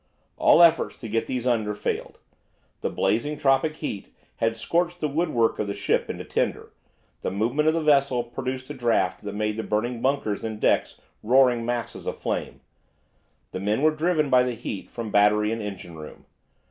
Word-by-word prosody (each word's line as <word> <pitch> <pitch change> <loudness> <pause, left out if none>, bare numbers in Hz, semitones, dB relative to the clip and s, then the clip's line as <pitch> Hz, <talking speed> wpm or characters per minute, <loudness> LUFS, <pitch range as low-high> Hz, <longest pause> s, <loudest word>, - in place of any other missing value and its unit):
All 170 - +6
efforts 165 -1 +4
to 115 - -8
get 115 +1 -1
these 125 -2 -3
under 110 -4 +1
failed. - - -4 0.6
The - - -2
blazing 145 +7 0
tropic 145 +2 +2
heat 105 -11 -6 0.3
had 115 0 0
scorched 175 +9 -1
the 155 - 0
woodwork 145 -7 +1
of 105 - -1
the 100 - -3
ship - - 0
into - - -5
tinder, - - -2 0.5
the - - -2
movement 120 +10 0
of 155 - +4
the 165 - 0
vessel 140 -4 +3
produced 130 +2 -5
a - - -4
draught 115 -8 0
that 100 -1 -6
made 105 0 -1
the - - -1
burning 115 +3 -2
bunkers 130 -6 0
and 110 -1 -4
decks - - +1 0.2
roaring 120 0 +3
masses 120 -1 -4
of - - -3
flame. - - -4 0.9
The - - -4
men 105 +7 0
were 155 - +5
driven 155 -1 0
by 125 -1 +6
the 125 -1 -1
heat 110 -4 -6
from 115 -2 -6
battery 105 +1 +4
and 115 0 -3
engine 95 -5 -7
room. 80 -1 -11
120 Hz, 185 wpm, -25 LUFS, 105-140 Hz, 0.9 s, All